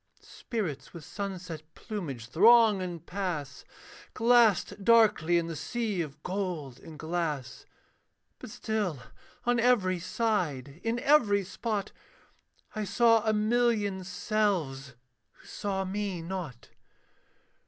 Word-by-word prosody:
Spirits 185 Hz, -, -5 dB
with 165 Hz, -, -9 dB
sunset 180 Hz, -5 st, -6 dB
plumage 155 Hz, -, -6 dB
throng 215 Hz, -, +6 dB
and 175 Hz, -2 st, -6 dB
pass, 170 Hz, -9 st, -4 dB, 0.5 s
Glassed 225 Hz, -4 st, +3 dB
darkly 210 Hz, -7 st, +4 dB
in 170 Hz, -, 0 dB
the 165 Hz, -1 st, -5 dB
sea 210 Hz, +5 st, -2 dB
of 150 Hz, -1 st, -7 dB
gold 180 Hz, -9 st, -4 dB
and 160 Hz, -2 st, -12 dB
glass. 155 Hz, -6 st, -3 dB, 0.7 s
But -, -, -9 dB
still 210 Hz, -8 st, -2 dB, 0.5 s
on 245 Hz, 0 st, +2 dB
every 210 Hz, -7 st, +3 dB
side, 170 Hz, -, -2 dB
in 230 Hz, +1 st, 0 dB
every 215 Hz, -9 st, +4 dB
spot, 205 Hz, +2 st, -3 dB, 0.8 s
I 215 Hz, -, -2 dB
saw 230 Hz, +2 st, +4 dB
a -, -, +4 dB
million 215 Hz, -3 st, +1 dB
selves, 180 Hz, -, -1 dB, 0.4 s
who -, -, -22 dB
saw 195 Hz, -1 st, -3 dB
me 190 Hz, -3 st, -3 dB
not. 170 Hz, -9 st, -6 dB
190 Hz, 110 wpm, -29 LUFS, 165-215 Hz, 0.8 s, throng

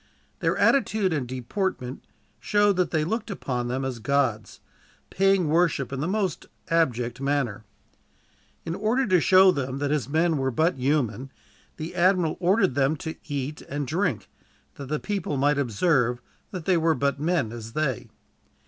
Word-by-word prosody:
Their -, -, 0 dB
attitude 215 Hz, -9 st, +2 dB
and 140 Hz, -5 st, -2 dB
deportment 130 Hz, -, -3 dB, 0.4 s
showed 205 Hz, -1 st, +2 dB
that 180 Hz, -, +1 dB
they 155 Hz, -2 st, 0 dB
looked 220 Hz, +7 st, -3 dB
upon 125 Hz, -, -3 dB
them 130 Hz, +2 st, -2 dB
as 130 Hz, -3 st, -4 dB
gods, 125 Hz, -3 st, -1 dB, 0.5 s
paying 195 Hz, -2 st, +3 dB
worship 155 Hz, -4 st, +1 dB
in 135 Hz, -, -3 dB
the 150 Hz, -, -1 dB
most 195 Hz, -4 st, -2 dB, 0.2 s
abject 130 Hz, -7 st, 0 dB
manner. 135 Hz, -7 st, -1 dB, 1.0 s
In 165 Hz, -, -3 dB
order 220 Hz, +8 st, +1 dB
to 185 Hz, -5 st, +3 dB
show 190 Hz, +1 st, +6 dB
them 135 Hz, -4 st, -3 dB
that 145 Hz, 0 st, -1 dB
his 150 Hz, -3 st, -1 dB
men 160 Hz, +1 st, +2 dB
were 135 Hz, 0 st, 0 dB
but 160 Hz, +6 st, +1 dB
human, 130 Hz, -2 st, 0 dB, 0.5 s
the 160 Hz, +3 st, -6 dB
admiral 180 Hz, -2 st, +2 dB
ordered 185 Hz, -, +2 dB
them 140 Hz, +3 st, +2 dB
to 160 Hz, +2 st, -5 dB
eat 145 Hz, 0 st, -4 dB
and 145 Hz, 0 st, -4 dB
drink, 165 Hz, -, -1 dB, 0.5 s
that 140 Hz, -, -9 dB
the 150 Hz, +2 st, -2 dB
people 195 Hz, -8 st, -3 dB
might 145 Hz, +1 st, +2 dB
observe 125 Hz, -, +1 dB, 0.3 s
that 185 Hz, -6 st, -7 dB
they 185 Hz, -2 st, +3 dB
were 165 Hz, -1 st, +2 dB
but 140 Hz, -1 st, 0 dB
men, 160 Hz, -7 st, 0 dB
as 115 Hz, -1 st, -8 dB
they. 140 Hz, -5 st, -2 dB
150 Hz, 160 wpm, -25 LUFS, 130-180 Hz, 1.0 s, show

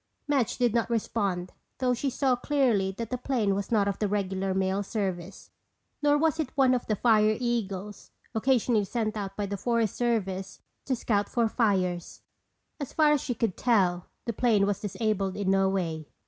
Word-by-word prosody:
Madge 275 Hz, -6 st, +1 dB
did 245 Hz, -3 st, +2 dB
not 230 Hz, -1 st, +1 dB
respond 200 Hz, -6 st, -1 dB, 0.2 s
though 255 Hz, -1 st, +1 dB
she 270 Hz, +3 st, -1 dB
saw 260 Hz, 0 st, +1 dB
clearly 245 Hz, -8 st, +1 dB
that 230 Hz, 0 st, -5 dB
the 250 Hz, -, -2 dB
plane 240 Hz, -6 st, 0 dB
was 200 Hz, +2 st, -3 dB
not 205 Hz, -3 st, +3 dB
of 200 Hz, -, -2 dB
the 210 Hz, -, +1 dB
regular 195 Hz, -1 st, -1 dB
mail 190 Hz, +1 st, 0 dB
service. 190 Hz, -3 st, -4 dB, 0.5 s
Nor 290 Hz, 0 st, +4 dB
was 320 Hz, +1 st, +1 dB
it 305 Hz, -5 st, -1 dB
one 260 Hz, -2 st, +5 dB
of 245 Hz, -, -1 dB
the 215 Hz, -, +1 dB
"Fire 215 Hz, -1 st, +3 dB
Eagles" 210 Hz, -5 st, -3 dB, 0.2 s
occasionally 235 Hz, -2 st, +2 dB
sent 215 Hz, +1 st, -2 dB
out 195 Hz, -2 st, -5 dB
by 205 Hz, -, -1 dB
the 200 Hz, 0 st, -4 dB
Forest 230 Hz, 0 st, 0 dB
Service 195 Hz, -6 st, -1 dB, 0.3 s
to 265 Hz, -, 0 dB
scout 205 Hz, -4 st, 0 dB
for 235 Hz, -2 st, +1 dB
fires. 185 Hz, -7 st, -1 dB, 0.6 s
As 285 Hz, -, -5 dB
far 305 Hz, -2 st, +4 dB
as 295 Hz, -3 st, +2 dB
she 245 Hz, -, -3 dB
could 225 Hz, -6 st, -1 dB
tell 185 Hz, -7 st, +2 dB, 0.2 s
the 235 Hz, -, -2 dB
plane 215 Hz, -3 st, +3 dB
was 200 Hz, -1 st, -1 dB
disabled 205 Hz, -2 st, -1 dB
in 195 Hz, -2 st, 0 dB
no 195 Hz, 0 st, +3 dB
way. 165 Hz, -5 st, -2 dB
215 Hz, 185 wpm, -28 LUFS, 195-245 Hz, 0.6 s, one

